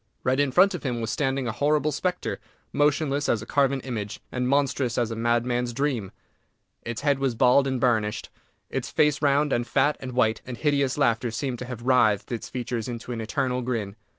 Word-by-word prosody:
Right 130 +2 +1
in 145 -2 +2
front 190 +8 +5
of 180 - -4
him 125 -4 -2
was 110 -1 -2
standing 135 -1 -1
a - - 0
horrible 150 +5 +1
spectre, 180 +5 -2 0.3
motionless 145 -1 +1
as 110 -2 +1
a - - -9
carven 135 +1 +1
image, 110 -6 -5
and 125 -1 -1
monstrous 140 -3 +1
as 120 -2 0
a - - -3
madman's 120 +1 0
dream! 125 -7 -1 0.7
Its 120 -1 -5
head 145 -2 +2
was 135 -3 0
bald 130 +3 +4
and 130 -1 -1
burnished; 110 -4 0 0.4
its - - -3
face 150 -1 +2
round, 145 0 +2
and 120 0 0
fat, 145 +2 +2
and 130 -1 -7
white; 115 -3 +2
and 125 -2 -7
hideous 140 -3 +1
laughter 120 -4 +2
seemed 120 +2 -3
to 125 - -5
have 120 -2 -7
writhed 120 -5 +3
its 120 - -4
features 120 -2 -3
into 120 0 -6
an 115 -2 -3
eternal 125 +3 -1
grin. 115 -5 -3
125 Hz, 200 wpm, -25 LUFS, 120-140 Hz, 0.7 s, front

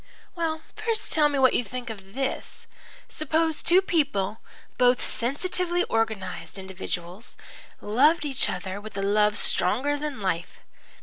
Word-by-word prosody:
"Well, 320 -2 -2
first 435 0 0
tell 300 -2 +4
me 285 - -1
what 260 -1 +5
you - - +2
think 240 +2 -6
of 195 -2 -12
this. 270 0 -3 0.4
Suppose 315 +1 0
two 365 +3 +5
people, 275 - 0 0.4
both 250 0 +5
sensitively 350 +7 -1
organized 220 -4 -2
individuals, 190 +1 -6 0.4
loved 295 +9 +3
each 270 -3 +1
other 190 +2 -4
with 215 -1 -9
a 195 - -1
love 210 +1 +3
stronger 285 +9 +2
than 295 -4 -4
life. 180 -3 -3
255 Hz, 135 wpm, -26 LUFS, 200-310 Hz, 0.4 s, what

